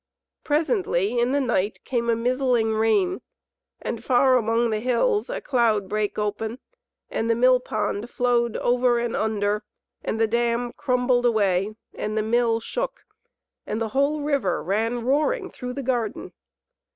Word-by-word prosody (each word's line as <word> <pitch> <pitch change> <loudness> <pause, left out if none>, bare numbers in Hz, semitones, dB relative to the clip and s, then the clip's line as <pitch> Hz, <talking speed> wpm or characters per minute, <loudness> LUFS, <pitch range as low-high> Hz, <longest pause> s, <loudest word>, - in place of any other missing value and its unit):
Presently 295 - +1
in 240 +2 +2
the 285 - +2
night 225 -6 -1
came 235 -2 -1
a 230 - +3
mizzling 245 -1 +1
rain, 290 - +1 0.6
and 230 -1 -5
far 255 +1 +4
among 230 0 +1
the 215 - 0
hills 415 - +1
a - - -3
cloud 225 -7 +1
brake 210 +1 -2
open, 215 +2 -2 0.5
and 225 - -1
the 230 - +3
mill 255 +2 +5
pond 215 -1 -3
flowed 240 -2 +1
over 245 0 +2
and 235 -1 -1
under, 210 -1 0 0.4
and 220 - -2
the 225 - +4
dam 235 +1 0
crumbled 250 -1 +1
away, 205 -2 +1 0.2
and 215 +1 -3
the 215 - +1
Mill 230 0 +2
shook, - - -4 0.6
and 215 - -2
the 225 -1 -2
whole 280 +5 +1
river 280 -11 0
ran 225 +5 -1
roaring 375 - +1
through 250 -1 -6
the 275 +1 -5
garden. 240 -4 -2
235 Hz, 150 wpm, -24 LUFS, 220-255 Hz, 0.6 s, mill